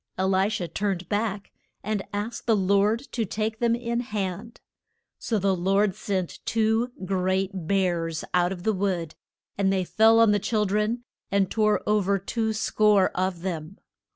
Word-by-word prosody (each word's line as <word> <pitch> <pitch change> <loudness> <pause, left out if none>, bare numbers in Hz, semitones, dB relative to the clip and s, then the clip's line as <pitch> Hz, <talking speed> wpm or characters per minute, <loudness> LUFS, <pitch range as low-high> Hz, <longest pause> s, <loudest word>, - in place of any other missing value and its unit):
E 185 - 0
li 190 +1 +2
sha 215 -5 -2
turned 185 +1 -2
back, 205 -1 -2 0.3
and 210 0 -1
asked 210 +4 -4
the 225 - +4
Lord 200 +3 +2
to 235 - -1
take 220 +2 -3
them 235 -1 +2
in 235 0 -2
hand. 210 -1 -4 0.6
So 225 - -1
the 195 -1 +1
Lord 195 +3 +2
sent 190 -3 -3
two 225 +2 +1
great 190 0 0 0.2
bears 170 -4 0
out 180 0 +3
of 180 -2 -6
the 220 - +2
wood, 185 -5 -1 0.5
and 195 -1 +3
they 190 -1 +1
fell 220 +5 +4
on 225 -2 +6
the 205 - +2
chil 210 +1 0
dren 210 +4 0 0.3
and 200 -1 +1
tore 215 -1 +2
o 210 0 +3
ver 200 0 +1
two 220 +3 -2
score 210 -2 +3
of 185 -2 -2
them. 170 0 -4
200 Hz, 170 wpm, -25 LUFS, 185-220 Hz, 0.6 s, on